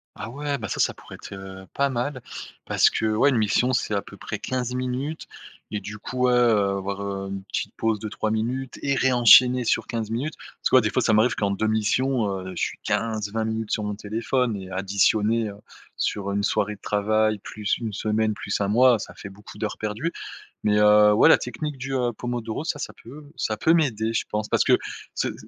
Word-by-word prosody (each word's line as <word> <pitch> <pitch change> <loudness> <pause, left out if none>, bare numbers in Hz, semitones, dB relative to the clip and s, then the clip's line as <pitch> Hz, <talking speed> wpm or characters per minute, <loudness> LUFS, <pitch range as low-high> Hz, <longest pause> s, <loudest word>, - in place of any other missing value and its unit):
Ah 110 - -6
ouais, 140 +1 -3
bah, 110 - -4
ça, - - -4
ça - - +2
pourrait - - -12
être, - - -10
heu, 95 0 -9
pas 140 0 +1
mal 130 +1 -3 0.4
parce - - +4
que, - - -1
ouais, 140 +6 +4
une 125 - +1
mission 110 +4 +2
c'est 105 -3 0
à 100 - 0
peu - - -12
près - - -5
15 125 -1 -3
minutes 130 +5 -3 0.5
et 105 - -2
du 105 +1 -8
coup, 125 +4 -1
ouais, 125 - +3
heu, 120 -2 +4 0.2
avoir, 100 +1 -4
heu, 100 -1 -4
une 95 0 -5
petite - - -4
pause 110 -1 +1
de 110 - -5
3 110 - -2
minutes 120 +4 -2
et 140 - +1
ré-enchaîner 125 -1 +6
sur 115 - 0
15 115 -2 -3
minutes. 140 +7 -2 0.2
Parce - - 0
que, - - +3
ouais, 130 - +8
des 105 - 0
fois 130 - +1
ça 115 - +2
m'arrive 110 +3 +4
qu'en 100 -1 -1
2 100 +2 -1
missions, 110 +2 +1 0.2
heu, - - -6
je - - -4
suis - - -2
15-20 110 -1 -1
minutes 110 -1 -3
sur 105 - 0
mon 105 -1 -3
téléphone 115 +3 -1
et 95 -2 -7
additionné, 105 +4 +1
heu, 100 - -9 0.4
sur 100 -1 -1
1 100 0 -1
soirée 105 0 0
de - - -24
travail, 110 +1 +1
plus 105 +1 -3
1 115 -2 -4
semaine, 110 +1 0
plus 100 0 -3
1 100 - +1
mois, 120 +2 +5
ça - - -8
fait 100 - -9
beaucoup 105 +1 -13
d'heures 105 0 -4
perdues. 110 +10 -2 0.5
Mais, 105 0 +2
heu, 105 0 +6
ouais, 105 - +6
la - - +8
technique 145 +4 -5
du, 135 +1 -5
heu, 125 -3 0
pomodoro 120 +2 -4
ça, 160 -2 -2
ça - - -6
peut 145 +4 -12
ça 110 -1 -2
peut 165 +7 +4
m'aider 115 -8 +1
je - - 0
pense, 105 0 -2
parce - - +2
que - - +4 0.4
se - - 0
s - - -6
110 Hz, 225 wpm, -24 LUFS, 105-125 Hz, 0.5 s, ouais